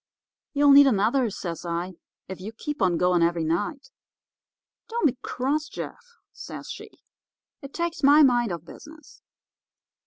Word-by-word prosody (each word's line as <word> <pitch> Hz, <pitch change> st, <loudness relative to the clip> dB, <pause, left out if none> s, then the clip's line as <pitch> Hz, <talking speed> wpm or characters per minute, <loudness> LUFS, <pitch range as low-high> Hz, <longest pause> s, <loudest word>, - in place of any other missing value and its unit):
"'You'll 285 Hz, 0 st, +4 dB
need 280 Hz, 0 st, +8 dB
another,' 230 Hz, +2 st, +2 dB
says 175 Hz, -4 st, -6 dB
I, 175 Hz, +2 st, -4 dB, 0.3 s
'if 190 Hz, -1 st, -8 dB
you 215 Hz, +4 st, -7 dB
keep 295 Hz, +3 st, -6 dB
on 180 Hz, -3 st, +2 dB
going 180 Hz, 0 st, +2 dB
every 170 Hz, 0 st, +1 dB
night.' 205 Hz, -, -3 dB, 1.0 s
"'Don't 465 Hz, -4 st, -1 dB
be 260 Hz, -4 st, +2 dB
cross, 290 Hz, +5 st, -2 dB
Jeff,' 475 Hz, -1 st, -9 dB, 0.2 s
says -, -, -9 dB
she; -, -, -9 dB, 0.7 s
'it 275 Hz, -, -10 dB
takes 340 Hz, +1 st, -3 dB
my 290 Hz, +2 st, +6 dB
mind 240 Hz, -5 st, +3 dB
off 170 Hz, -1 st, -6 dB
business. 310 Hz, -, -14 dB
245 Hz, 145 wpm, -25 LUFS, 180-290 Hz, 1.0 s, need